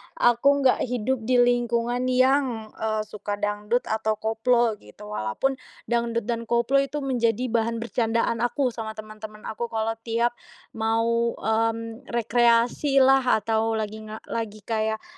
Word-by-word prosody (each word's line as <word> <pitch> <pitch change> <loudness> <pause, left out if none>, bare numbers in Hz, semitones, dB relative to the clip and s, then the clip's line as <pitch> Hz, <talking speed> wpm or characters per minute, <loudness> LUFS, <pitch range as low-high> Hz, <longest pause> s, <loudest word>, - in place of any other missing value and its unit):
aku 275 +4 +3
nggak 260 - +4
hidup 250 +1 -1
di 250 -1 +5
lingkungan 240 0 +1
yang, 255 -3 +2
eee, 215 -1 -2
suka 210 -1 -5
dangdut 210 +3 -1
atau 220 0 -1
koplo 225 0 +1
gitu. 105 0 -13
Walaupun 110 - -1 0.3
dangdut 235 0 0
dan 230 +1 -3
koplo 240 +4 +2
itu 275 +1 -2
menjadi 245 -2 0
bahan 230 0 +1
bercandaan, 230 -1 0
aku 245 +2 0
sama 220 -1 -6
teman-teman 215 0 -10
aku 235 +2 -4
kalau 225 -1 -1 0.2
tiap 235 +1 +1 0.4
mau, 230 +1 0
mmm, 225 +2 -2
rekreasilah 245 +2 +3
atau 225 +1 +1
lagi 215 0 -4
nga 215 +1 -8 0.4
kayak 220 0 -1
230 Hz, 130 wpm, -25 LUFS, 220-245 Hz, 0.4 s, di